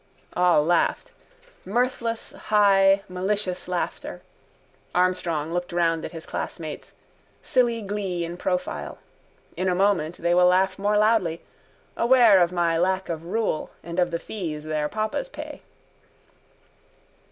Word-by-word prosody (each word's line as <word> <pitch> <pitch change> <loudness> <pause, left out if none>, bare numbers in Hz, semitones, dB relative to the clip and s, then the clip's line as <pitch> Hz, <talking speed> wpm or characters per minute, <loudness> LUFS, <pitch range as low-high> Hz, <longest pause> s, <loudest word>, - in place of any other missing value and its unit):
All 180 -4 +3
laughed. 175 +1 +1 0.5
Mirthless 235 +1 -1
high 195 -2 +4
malicious 185 0 -2
laughter. 180 -1 -4 0.7
Armstrong 175 -3 0
looked 175 0 -2
round 165 -2 +1
at - - -5
his 165 -2 -8
classmates, 155 -3 -6 0.5
silly 235 -3 +1
glee 195 -4 -3
in 170 +1 -6
profile. 180 - -3 0.6
In 185 +2 0
a 180 - +1
moment 180 -4 +1
they 170 +1 +1
will 180 0 +5
laugh 190 +2 +2
more 205 +1 +2
loudly, 210 -6 +2 0.5
aware 235 -5 +6
of 175 0 +3
my 170 -2 +1
lack 190 +1 0
of 165 -1 -4
rule 210 -3 -1
and 170 +1 -4
of 175 -1 +3
the 170 - -2
fees 165 -5 -5
their 155 -1 -2
papas 215 - -2
pay. - - -8
180 Hz, 130 wpm, -24 LUFS, 170-205 Hz, 0.7 s, aware